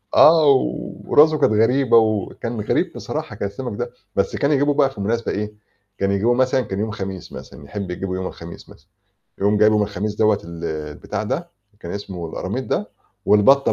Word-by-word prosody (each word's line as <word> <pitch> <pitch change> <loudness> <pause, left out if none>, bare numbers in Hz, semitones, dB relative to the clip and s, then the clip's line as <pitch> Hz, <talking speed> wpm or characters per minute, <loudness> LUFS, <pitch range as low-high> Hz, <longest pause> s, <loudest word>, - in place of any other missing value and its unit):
آه، 155 -3 +7 0.5
وراسه 155 +1 +5
كانت 110 - +3
غريبة 115 +2 +4
وكان 110 +1 0
غريب - - 0
بصراحة، - - -5
كان 100 - -3
السَمَك 120 0 -6
ده، 120 0 -3 0.2
بس 100 - 0
كان 140 +1 +1
يجيبه 145 +1 +3
بقى 140 -2 +3
في 105 -7 -9
مناسبة 115 +3 -1
إيه، 105 +1 -3 0.4
كان 100 0 0
يجيبه 110 +5 +2
مثلًا 130 +1 +2
كان 100 -3 -5
يوم 110 0 -1
خميس 95 -4 -6
مثلًا 70 - -10
يحب 100 +1 -5
يجيبه 95 +1 -4
يوم 95 0 -3
الخميس 85 0 -10
مثلًا، - - -18 0.5
يقوم 105 +2 +2
جايبه 105 0 +5
من - - +3
الخميس 105 +1 -3
دوّة 105 -1 +3
ال 85 0 -8
البتاع 75 -2 -4
ده - - -3 0.3
كان 85 - -7
اسمه 95 -4 -6
الأراميط - - -4
ده، - - -2 0.4
والبَطّة 135 +7 +5
105 Hz, 185 wpm, -21 LUFS, 95-120 Hz, 0.5 s, آه